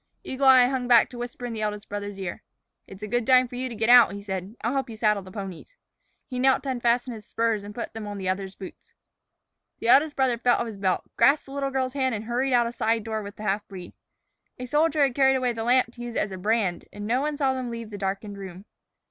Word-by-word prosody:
Eagle 265 +1 -1
Eye 260 -2 +8
hung 250 -1 -1
back 235 -3 +6
to 245 - -10
whisper 245 0 -6
in 240 - -4
the 220 - -4
eldest 210 0 -3
brother's 205 -1 -5
ear. 190 -3 -5 0.5
"It's 195 +2 -12
a - - -3
good 240 +3 0
time 255 -1 +5
for 245 - -10
you 255 +1 -3
to 235 - -7
get 220 +1 -1
out," 245 -4 +7
he 200 0 -7
said. 190 +1 -5
"I'll 230 +3 0
help 270 -2 -1
you 225 - -7
saddle 210 -2 +2
the 185 0 -12
ponies." 195 - -8 0.5
He 250 -3 -5
knelt 265 +1 +3
to 275 - -4
unfasten 245 0 0
his 220 -2 -9
spurs 225 -1 -1
and 205 0 -9
put 235 - -5
them 220 -2 -6
on 205 0 -5
the 190 -1 -4
other's 190 +1 -2
boots. 190 - -12 0.8
The 230 - -2
eldest 290 +4 +5
brother 255 -3 +1
felt 245 0 +3
of - - -1
his 220 -3 -7
belt, 190 -2 0
grasped 285 +1 +4
the 270 - -12
little 275 -1 -1
girl's 260 -1 -2
hand, 260 -3 0
and 210 - -5
hurried 250 +3 -1
out 240 -1 +4
of 235 - -4
a - - -20
side 225 0 +1
door 220 0 -3
with 205 0 -9
the 215 - -9
half 210 0 -1
breed. 185 -3 -10 0.6
A 250 - -6
soldier 300 +2 +2
had 270 -3 +2
carried 265 0 +4
away 250 -2 0
the 225 -1 -4
lamp 245 0 +2
to 240 - -11
use 240 -1 -6
it - - +1
as 205 - -6
a 190 - -6
brand, 205 -3 0
and 205 - -7
no 245 +4 +1
one 300 0 -2
saw 270 -3 +1
them 255 -2 -4
leave 230 -2 -7
the 205 - -6
darkened 200 +1 -4
room. 190 0 -9
235 Hz, 270 wpm, -25 LUFS, 205-255 Hz, 0.8 s, Eye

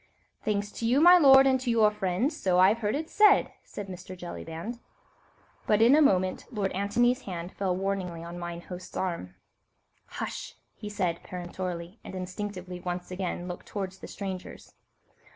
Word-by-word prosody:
"Thanks 205 -1 -1
to 230 - -3
you, 250 +4 +4
my 355 +3 +8
lord, 270 -3 +8
and 260 -1 +3
to 255 - -2
your 220 -2 +4
friends, 210 - -1
so 185 -2 +1
I've 195 +5 +5
heard 210 0 0
it 310 +2 -3
said," 415 +2 +5
said 205 - -7
Mr. 185 0 -8
Jellyband. 175 +5 -6 0.9
But 210 - +4
in 230 +4 +6
a 310 - +5
moment 185 -9 +2
Lord 205 -5 -1
Antony's 240 +7 +1
hand 175 -2 -5
fell 190 -2 -1
warningly 185 -3 -3
on 170 +1 -7
mine 170 0 -5
host's 180 +1 -9
arm. 170 - -3 0.7
"Hush!" - - -6 0.2
he 210 - -8
said 185 -5 -1
peremptorily, 180 +1 -6
and - - -8
instinctively 185 -1 -5
once 180 0 -5
again 180 -1 -3
looked 180 -1 -7
towards 190 -2 -5
the - - -9
strangers. 190 -2 -7
190 Hz, 165 wpm, -28 LUFS, 180-220 Hz, 0.9 s, my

